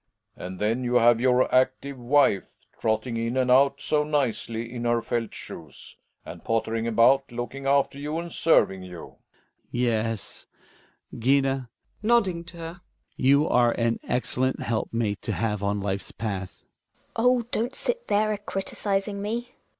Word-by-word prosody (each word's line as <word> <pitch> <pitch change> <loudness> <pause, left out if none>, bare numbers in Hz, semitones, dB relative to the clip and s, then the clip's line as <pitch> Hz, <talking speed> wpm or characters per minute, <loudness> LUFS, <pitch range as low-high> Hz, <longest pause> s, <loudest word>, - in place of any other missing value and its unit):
And 95 +1 -7
then 110 +6 0
you 125 0 0
have 120 -1 +5
your 125 0 +3
active 130 +2 +2
wife, 125 -5 +2 0.2
trot 110 -1 +1
ting 120 -3 -4
in 115 +2 -1
and 130 -1 +2
out 140 +2 +5
so 150 -1 +1
nicely, 120 -5 -2
in 120 -1 -4
her 120 0 +2
felt 115 -1 -2
shoes, 80 -5 -10 0.3
and - - -9
pottering 115 0 -1
about, 120 +4 +4
looking 120 +3 -5
after 140 0 +2
you 150 +2 -3
and 170 0 -5
serving 95 - +3
you. 90 -1 -9
Hjalmar. - - -11 0.5
Yes, 115 -3 -2 0.7
Gina 135 +1 +1 0.3
(nodding 205 -6 +2
to 170 +1 -10
her), 165 +2 -8 0.3
you 140 +3 +4
are 120 -1 +4
an 115 -1 0
excellent 130 +1 0
helpmate 110 -2 -1
to - - -3
have 105 -3 -1
on 100 0 0
life's 100 0 -3
path. 100 -4 -5
Gina. - - -43 0.2
Oh 250 0 +5
I - - -12
don't 240 +4 -1
sit 485 0 -3
there 215 +1 +2
a 205 - -4
criticising 200 0 -2
me. 235 +4 -3
Relling. - - -35
125 Hz, 160 wpm, -26 LUFS, 115-150 Hz, 0.7 s, have